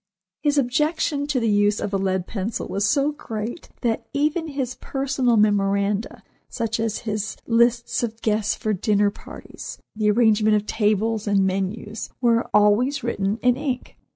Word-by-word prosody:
His 290 0 +1
objection 285 +2 +1
to 290 -3 +1
the 230 - 0
use 205 0 +3
of 205 - -3
a - - +3
lead 190 -2 0
pencil 205 +2 -4
was 200 +1 0
so 285 +4 +2
great 230 -1 -6
that 230 -3 -1
even 305 +3 0
his 270 -4 -3
personal 270 -3 0
memoranda, 200 0 +1 0.3
such 225 0 -2
as 225 -2 -1
his 215 0 -3
lists 235 0 +2
of 225 -2 -3
guests 215 -1 +1
for 215 - -1
dinner 205 +1 +2
parties, - - -10 0.2
the 215 -1 +1
arrangement 215 -1 +4
of 210 0 0
tables 215 0 0
and 200 -1 +3
menus, 195 +3 -3
were 235 -2 +2
always 210 +7 +3
written 205 -3 -1
in 250 -1 +4
ink. 265 -3 -4
220 Hz, 155 wpm, -23 LUFS, 205-250 Hz, 0.3 s, arrangement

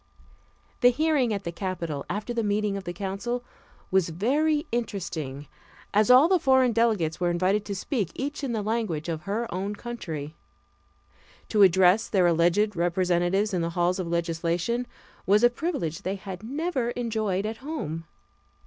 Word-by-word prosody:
The 245 - +7
hearing 280 -2 +1
at 200 -2 -2
the 170 - -3
Capitol, 170 -5 -4
after 215 +4 -3
the 235 - 0
meeting 205 -1 0
of 195 -1 -6
the 175 - -3
council, 200 +7 -3 0.5
was 185 -3 +3
very 295 - +1
interesting, 160 - -4 0.5
as 210 +3 +3
all 255 +5 +8
the 370 0 +3
foreign 260 -3 +4
delegates 210 -9 +1
were 175 -1 +1
invited 185 +4 +1
to 200 - -4
speak 205 - -2
each 290 +2 -4
in 265 - -1
the 220 -3 -1
language 205 -8 -2
of 160 -2 -3
her 225 +4 0
own 195 +3 -3
country; 165 -11 -6 1.2
to 215 - +2
address 190 +2 +5
their 185 -3 +3
alleged 175 +5 +3
representatives 175 +3 +1
in 180 - +1
the 165 - -1
halls 175 +2 +2
of 180 - -2
legislation 170 +7 -1 0.4
was 205 +4 +4
a 240 - +6
privilege 240 - -3
they 190 +2 -2
had 190 -1 -8
never 270 +1 -2
enjoyed 215 -5 -1
at 220 +1 -3
home. 230 - -5
200 Hz, 160 wpm, -26 LUFS, 175-235 Hz, 1.2 s, all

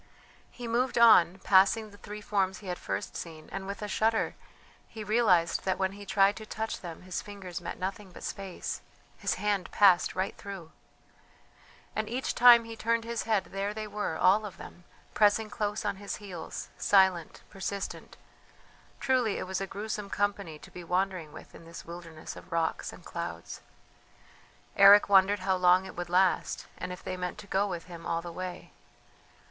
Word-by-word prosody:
He 245 -2 -8
moved 240 +2 0
on, 190 -6 +7
passing 205 +3 +4
the 205 - -15
three 210 +1 -8
forms 190 -2 0
he 210 - -13
had 180 -1 -4
first - - -4
seen, 160 -2 -8
and 195 0 -5
with 200 +1 -5
a - - -3
shudder 220 +2 +1 0.5
he 220 -2 -8
realized 205 -6 +3
that 190 -1 0
when 190 0 0
he 200 0 -11
tried 195 +1 +4
to 220 - -8
touch 220 +1 -4
them 170 -1 -8
his 185 -1 -4
fingers 190 -4 -8
met 170 - -6
nothing 190 +1 -5
but - - -12
space 195 -2 -5 0.4
his - - 0
hand 205 -3 -1
passed 190 -4 +4
right 190 +1 -2
through! 190 -5 -9 1.2
And 215 0 -2
each 255 +3 -2
time 240 -1 +8
he 230 0 -8
turned 230 +1 0
his 235 0 -3
head 215 -3 +1
there 200 +2 -3
they 215 0 -4
were, 210 -5 -3
all 200 +4 +4
of 200 -3 -8
them, 175 - -12 0.3
pressing 210 0 +3
close 210 +1 -2
on 200 -2 -1
his 200 0 -5
heels, 190 -5 -7
silent, 190 -4 +3
persistent. 195 0 -5 0.8
Truly 255 -5 +1
it - - -4
was 190 +1 -3
a 195 - -2
gruesome 210 0 -5
company 200 -6 -2
to - - -15
be 180 - -9
wandering 180 -2 -1
with - - -12
in 165 - -13
this 165 0 -10
wilderness 165 -2 -9
of - - -13
rocks 165 -1 -1
and - - -14
clouds. - - -6 1.1
Eric 200 +1 +8
wondered 195 0 +5
how 190 0 +1
long 180 +1 +4
it - - -9
would 175 0 -5
last, 185 +1 +2
and 180 - -4
if 180 - -8
they 185 - -4
meant 180 +1 -4
to 210 - -10
go 200 +1 +1
with 175 -4 -4
him 170 -2 -9
all 165 0 -1
the 175 - -6
way. 185 +1 -7
195 Hz, 185 wpm, -29 LUFS, 180-210 Hz, 1.2 s, time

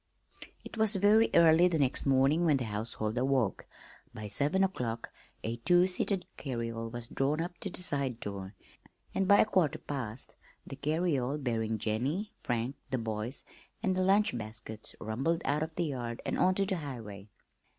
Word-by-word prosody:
It - - -9
was 220 -1 +4
very 210 +4 +5
early 165 +1 +7
the 170 -2 +1
next 140 -1 +1
morning 135 +5 +4
when 155 -4 +4
the 130 - -2
household 110 +1 -2
awoke. 130 -5 +1 0.5
By 105 -1 -6
seven 150 - +1
o'clock 120 -11 -2 0.3
a 115 +1 -2
two 175 +9 +4
seated 185 0 0
carryall 115 -3 -3
was 120 -1 -5
drawn 140 +5 0
up 175 +1 -4
to 195 - -4
the 180 - -2
side 140 -7 -1
door, 100 0 -6 0.6
and 195 - +1
by 200 - +7
a - - +4
quarter 185 -9 +2
past 130 -4 -6 0.3
the - - -7
carryall, 150 -2 0
bearing 115 -5 -1
Jennie, 135 - -1
Frank, 120 +2 -2
the 130 - 0
boys, 115 +2 -3 0.4
and 190 -3 +2
the 185 - +1
lunch 195 -3 +3
baskets, 110 -1 -7
rumbled 135 +11 -1
out 150 +2 +1
of 160 0 -3
the 170 - 0
yard 120 -5 -4
and - - -1
on 185 0 +4
to 195 - +2
the 190 -1 -1
highway. 110 - -7
135 Hz, 170 wpm, -31 LUFS, 115-175 Hz, 0.6 s, early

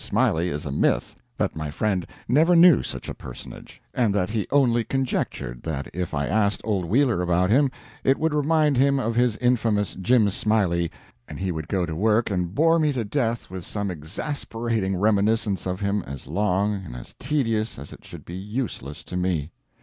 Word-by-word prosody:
Smiley 85 +3 +1
is 75 -2 -4
a 70 - -3
myth 70 - +1 0.2
that - - -1
my 80 -1 -4
friend 95 +4 -1 0.2
never 160 +8 +4
knew 170 0 +7
such - - -6
a - - -4
personage; 60 - -10
and 115 -5 +1
that 100 0 0
he 110 -2 -1
only 125 -4 +3
conjectured 120 - -2
that 70 -4 -4
if 90 -3 -3
I 70 0 0
asked 105 +3 +1
old 100 -5 -1
Wheeler 120 - +2
about 90 +2 +2
him, 135 +3 +4 0.3
it 135 - +3
would 160 -1 0
remind 150 -1 +2
him 140 +1 +3
of 115 -2 -1
his 120 -2 +2
infamous 115 -5 +1
Jim 110 +3 +3
Smiley, 95 -6 +1 0.4
and - - -8
he 95 -1 -1
would 80 -3 -5
go 95 -3 0
to 80 -2 -5
work 110 +4 +2
and 90 -1 -2
bore 165 +3 +4
me 155 -2 +2
to 125 -3 -1
death 115 -3 -1
with 95 -2 -6
some 100 0 -3
exasperating 110 - -3
reminiscence 105 -1 +1
of 90 +2 -3
him 100 +1 0
as 70 -1 -7
long 100 +4 +1
and - - -9
as - - -9
tedious 115 -7 0
as 70 +1 -9
it - - -14
should - - -11
be 85 - -8
useless 95 - -5
to - - -8
me. 90 -4 -1
105 Hz, 190 wpm, -24 LUFS, 90-120 Hz, 0.4 s, knew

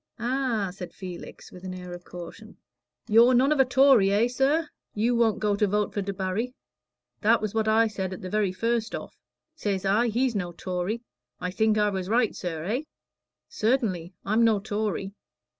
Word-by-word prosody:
"Ah!" 240 -5 -1
said 180 -2 -8
Felix, 180 -3 -9
with 180 - -12
an 185 -1 -5
air 180 -1 -8
of 175 0 -9
caution. 180 +6 -10 0.5
"You're 235 +3 +6
none 265 +4 +4
of 300 - +2
a 265 - +6
Tory, 255 -5 +5
eh, 210 +4 +3
sir? 280 +6 +1 0.3
You 230 +3 +2
won't 230 -2 +3
go 210 -1 +1
to 210 0 +2
vote 210 +1 0
for 205 - -1
Debarry? 200 +5 -3 0.7
That 225 +2 +4
was 215 -1 -3
what 220 -1 0
I 220 +1 +4
said 195 -4 -3
at 185 - -7
the - - -4
very 210 -3 +1
first 230 +3 -1
go - - -3
off. - - -15 0.4
Says 200 - -2
I, 210 +5 +3
he's 240 +2 +1
no 175 -3 -2
Tory. 185 +6 -3 0.4
I 180 0 -3
think 220 +2 +2
I 210 -1 +2
was 190 -1 -3
right, 230 0 +2
sir 165 -4 -4
eh?" 220 - -1 0.7
"Certainly; 205 -7 -1
I'm 215 +4 +3
no 220 -3 +4
Tory." 205 -1 -3
215 Hz, 190 wpm, -26 LUFS, 190-235 Hz, 0.7 s, You're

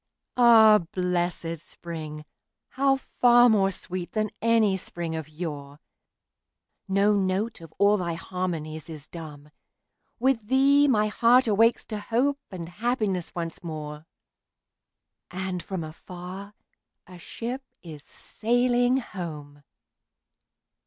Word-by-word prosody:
Ah, 225 -3 +7
blessed 175 -2 -1
spring!—how 165 - -4
far 245 -2 +4
more 200 -4 +4
sweet 185 -2 -6
than 215 -1 -1
any 225 -3 +3
spring 170 -3 -5
of 160 -2 -6
yore! 150 -3 -7 1.1
No 200 +2 +3
note 200 +2 -1
of 165 -2 -12
all 205 +1 +4
thy 170 -3 -2
harmonies 165 -4 -4
is 155 -3 -9
dumb; 150 -3 -10 0.7
With 240 -4 +1
thee 280 +3 +4
my 215 -6 +3
heart 240 +4 +4
awakes 225 +2 +3
to 215 -2 -5
hope 255 +7 0
and 175 -4 -7
happiness 205 -2 -2
once 165 -1 -5
more, 155 -1 -7 1.2
And 185 0 -4
from 185 -2 -5
afar 180 +5 -9 0.5
a 180 -1 -13
ship 240 +9 -5 0.2
is 155 -4 -10
sailing 245 - +1
home! 155 - -7
190 Hz, 110 wpm, -26 LUFS, 165-230 Hz, 1.2 s, Ah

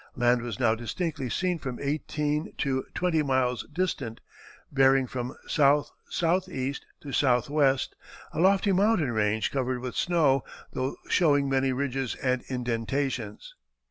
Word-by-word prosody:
Land 120 0 +3
was 115 -4 -5
now 115 -3 +4
distinctly 135 +4 -3
seen 180 +5 0
from 130 -4 -5
eighteen 150 +1 -2
to 130 -2 0
twenty 175 -3 +1
miles 130 -4 0
distant, 145 -9 -2 0.5
bearing 135 -1 +4
from 125 0 -5
S.S.E. 150 +1 +1 0.3
to 145 - -8
S.W., 135 +1 +3 0.6
a - - -3
lofty 195 +3 +4
mountain 190 - +3
range 110 -1 +1
covered 130 -2 -1
with 125 0 -5
snow, 150 -7 +2 0.3
though 130 +1 -2
showing 145 -5 +3
many 135 0 +2
ridges 135 -1 -2
and 130 -1 0
indentations." 125 -2 -2
135 Hz, 125 wpm, -27 LUFS, 125-150 Hz, 0.6 s, now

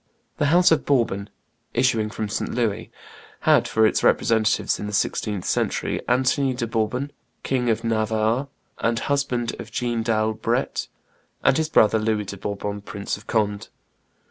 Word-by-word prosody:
The 145 - +2
house 175 +4 +5
of 160 - +3
Bourbon, 115 -7 0 0.5
issuing 115 -4 +2
from 110 0 -4
St. 105 - -3
Louis, 115 -2 -1 0.5
had - - +4
for 110 0 +3
its - - +2
representatives 110 -1 +2
in 105 - -4
the 105 - -6
sixteenth 105 -1 -1
century - - -1
Anthony 130 +1 +2
de 120 -1 -2
Bourbon, 115 +5 -1 0.3
King 125 -2 0
of 110 - 0
Navarre 110 +3 0 0.3
and 115 0 +1
husband 125 -2 -1
of 110 - -7
Jeanne 120 -1 -1
d'Albret, 110 -1 0 0.6
and - - +4
his 160 +1 0
brother 110 -6 +4
Louis 110 -1 0
de 100 - -7
Bourbon, 100 +1 -4
Prince 100 0 -4
of 105 +3 -15
Conde. 105 -2 0
110 Hz, 150 wpm, -23 LUFS, 105-125 Hz, 0.6 s, house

